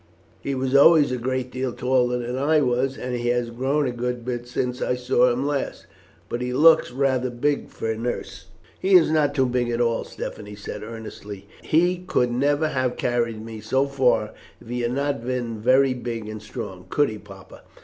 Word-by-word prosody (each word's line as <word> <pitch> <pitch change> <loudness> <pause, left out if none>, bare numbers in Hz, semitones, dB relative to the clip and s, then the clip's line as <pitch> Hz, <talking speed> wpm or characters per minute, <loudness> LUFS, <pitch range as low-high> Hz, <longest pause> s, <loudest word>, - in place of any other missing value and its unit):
He 140 - -2
was 130 +1 -1
always 145 0 +7
a 125 - -1
great 130 +1 -2
deal 130 -1 -3
taller 125 -1 +1
than 125 +1 -3
I 150 +4 +3
was, 130 +1 0
and 125 0 -4
he 120 0 -2
has 120 -1 0
grown 135 +5 0
a 125 - -1
good 120 0 -3
bit 120 -1 -4
since 125 0 -2
I 125 - 0
saw 125 0 +3
him 125 +3 -1
last. 145 -2 -2 0.4
But 120 - -4
he 125 0 -2
looks 160 +4 +6
rather 130 -1 +1
big 140 +4 -1
for 115 - -3
a - - -2
nurse." 120 +2 -5 0.3
"He 190 0 +3
is 165 -3 +6
not 145 -2 +2
too 135 -2 +3
big 125 -1 0
at 120 0 -1
all," 115 -1 +1
Stephanie 105 0 -7
said 100 - -7
earnestly. 105 -3 -9
"He 175 +3 +2
could 125 -9 0
never 145 +5 +1
have 130 -3 -1
carried 115 -3 -1
me 110 -1 -8
so 135 +4 +1
far 130 -6 +1 0.3
if - - -15
he 125 0 -2
had 120 +1 -1
not 140 -2 -1
been 120 -3 -3
very 130 +4 +4
big 120 -3 -5
and 110 0 -7
strong. 105 -5 -8
Could 145 -1 +2
he, 110 -1 -7
papa?" 100 -2 -14
125 Hz, 200 wpm, -24 LUFS, 120-135 Hz, 0.4 s, always